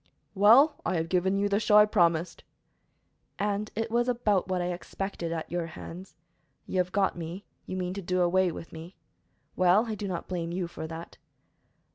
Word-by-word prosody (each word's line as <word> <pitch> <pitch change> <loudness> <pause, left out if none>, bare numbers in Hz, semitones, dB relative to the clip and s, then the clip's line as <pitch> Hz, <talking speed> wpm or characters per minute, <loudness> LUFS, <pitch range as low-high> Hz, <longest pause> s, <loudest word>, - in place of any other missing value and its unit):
"Well, 230 +10 +6
I 185 - -1
have 165 0 -1
given 190 +2 +1
you 200 +1 +1
the 200 0 +1
show 210 -1 +4
I 210 - +8
promised." 170 -5 +1 0.9
"And 205 +1 -1
it 225 +1 -2
was 240 +1 +1
about 210 -7 +1
what 185 -1 -1
I 175 0 -1
expected, 175 -1 -5
at 165 -2 -4
your 175 -1 -2
hands. 175 +3 -10 0.5
You 185 - -2
have 180 0 0
got 195 0 +1
me; 170 +3 -7 0.2
you 185 - -4
mean 180 0 -2
to 200 - -5
do 180 0 0
away 180 +1 +3
with 165 - -9
me. 165 +3 -10 0.6
Well, 185 +5 +4
I 225 - -3
do 205 -1 -4
not 180 -3 -4
blame 170 -2 -3
you 180 0 -2
for 160 -1 -7
that." 165 +1 -9
185 Hz, 190 wpm, -28 LUFS, 175-205 Hz, 0.9 s, I